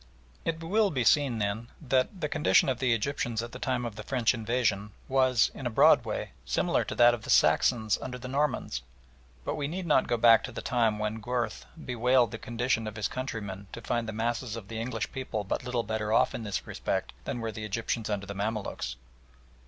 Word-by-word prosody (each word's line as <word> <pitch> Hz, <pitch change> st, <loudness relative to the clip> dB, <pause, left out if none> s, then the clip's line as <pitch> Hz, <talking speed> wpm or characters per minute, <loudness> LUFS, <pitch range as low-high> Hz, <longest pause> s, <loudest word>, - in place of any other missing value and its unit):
It 165 Hz, 0 st, -2 dB
will 205 Hz, +5 st, +2 dB
be 130 Hz, -8 st, 0 dB
seen, 135 Hz, -1 st, +3 dB
then, 105 Hz, +2 st, -2 dB
that 135 Hz, +5 st, 0 dB
the 150 Hz, -, +1 dB
condition 150 Hz, -2 st, +3 dB
of 130 Hz, -2 st, -1 dB
the 130 Hz, -2 st, +2 dB
Egyptians 115 Hz, -1 st, -1 dB
at 120 Hz, -, -7 dB
the 125 Hz, -, -8 dB
time 125 Hz, -2 st, -1 dB
of 115 Hz, -3 st, -6 dB
the -, -, -5 dB
French 120 Hz, +1 st, +1 dB
invasion 115 Hz, -3 st, 0 dB, 0.2 s
was, 130 Hz, -2 st, +3 dB
in 130 Hz, -, -4 dB
a -, -, -1 dB
broad 110 Hz, -, +5 dB
way, -, -, -3 dB
similar -, -, +1 dB
to -, -, -5 dB
that 120 Hz, 0 st, +6 dB
of 120 Hz, -, -4 dB
the -, -, -10 dB
Saxons 110 Hz, -4 st, +4 dB
under 125 Hz, -1 st, -5 dB
the 125 Hz, -, -8 dB
Normans, 135 Hz, -, -1 dB, 0.6 s
but -, -, -1 dB
we 145 Hz, -, -2 dB
need 180 Hz, +4 st, -4 dB
not 150 Hz, -5 st, +3 dB
go 120 Hz, -, +1 dB
back 115 Hz, 0 st, +6 dB
to 130 Hz, -, -7 dB
the -, -, -6 dB
time 115 Hz, -4 st, +2 dB
when 110 Hz, +1 st, -3 dB
Gurth 120 Hz, +2 st, -2 dB, 0.2 s
bewailed 125 Hz, -1 st, +3 dB
the 115 Hz, -, -6 dB
condition 120 Hz, -1 st, -1 dB
of 110 Hz, -, -6 dB
his 105 Hz, -1 st, -1 dB
countrymen 100 Hz, -6 st, -5 dB
to -, -, -6 dB
find 115 Hz, 0 st, -1 dB
the -, -, -2 dB
masses 115 Hz, +1 st, -2 dB
of 105 Hz, -3 st, -8 dB
the 115 Hz, -, -4 dB
English 115 Hz, -1 st, -3 dB
people 130 Hz, -5 st, -3 dB
but 100 Hz, -, -2 dB
little 125 Hz, -1 st, -1 dB
better 110 Hz, 0 st, -2 dB
off -, -, +3 dB
in -, -, -4 dB
this 105 Hz, -3 st, -3 dB
respect 65 Hz, -, -3 dB
than 120 Hz, -, -3 dB
were 115 Hz, -1 st, -3 dB
the 110 Hz, +1 st, -7 dB
Egyptians 110 Hz, +1 st, -2 dB
under 100 Hz, -2 st, -2 dB
the 100 Hz, -, -6 dB
Mamaluks. 100 Hz, -, -3 dB
120 Hz, 215 wpm, -29 LUFS, 110-130 Hz, 0.6 s, that